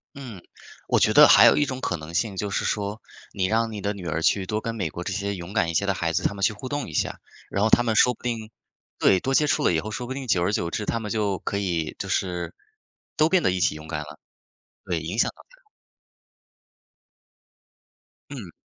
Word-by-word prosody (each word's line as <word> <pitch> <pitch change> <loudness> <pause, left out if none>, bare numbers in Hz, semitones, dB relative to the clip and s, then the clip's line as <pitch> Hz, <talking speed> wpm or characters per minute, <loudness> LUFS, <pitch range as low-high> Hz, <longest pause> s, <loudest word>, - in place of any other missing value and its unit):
嗯， 120 -10 -9 0.5
我 - - +3
觉 - - +3
得 - - +9
还 - - +8
有 - - +6
一 150 - +3
种 130 -2 -5
可 90 -8 -1
能 80 +1 -10
性 100 +2 -1
就 105 +1 -3
是 - - -1
说， 105 +1 -2 0.3
你 95 -2 0
让 115 +2 +1
你 105 - -6
的 100 +1 -1
女 95 -4 -7
儿 80 +1 -2
去 95 +2 +2
多 105 +3 -2
跟 115 0 -4
美 105 - -3
国 90 - -7
这 95 - -3
些 100 0 -2
勇 85 +2 -8
敢 90 -6 +1
一 - - -5
些 100 +5 +1
的 100 - +1
孩 85 -1 -1
子 - - -1
他 100 - 0
们 100 - -8
去 95 - +3
互 120 +5 -8
动 145 -2 -3
一 - - -9
下， - - -2 0.3
然 100 - -1
后 110 - +3
他 120 - +5
们 110 -2 0
说 125 +3 +5
不 - - -17
定 115 -3 -3 0.5
对， 95 - +4
多 135 - -2
接 150 - +4
触 - - +1
了 - - +3
以 80 - +1
后， 105 - -4
说 120 +3 -5
不 130 - -4
定 135 -1 -6
久 90 -7 +2
而 95 - +1
久 85 -5 -1
之， 105 +5 -3
他 115 - -1
们 105 -3 -5
就 105 -3 0
可 100 - -3
以 85 -5 -2
就 - - -6
是 90 -2 -2 0.6
都 155 - +4
变 185 +1 +3
得 - - +3
一 90 - -2
起 85 - +2
勇 75 0 -10
敢 75 -2 -4
了， 75 - -10 0.7
对， 85 -3 -2
影 85 +8 -5
响 - - +3
到 - - -17
她 - - -22
了。 - - -37 2.7
嗯。 - - -8
100 Hz, 270 characters per minute, -24 LUFS, 90-115 Hz, 2.7 s, 得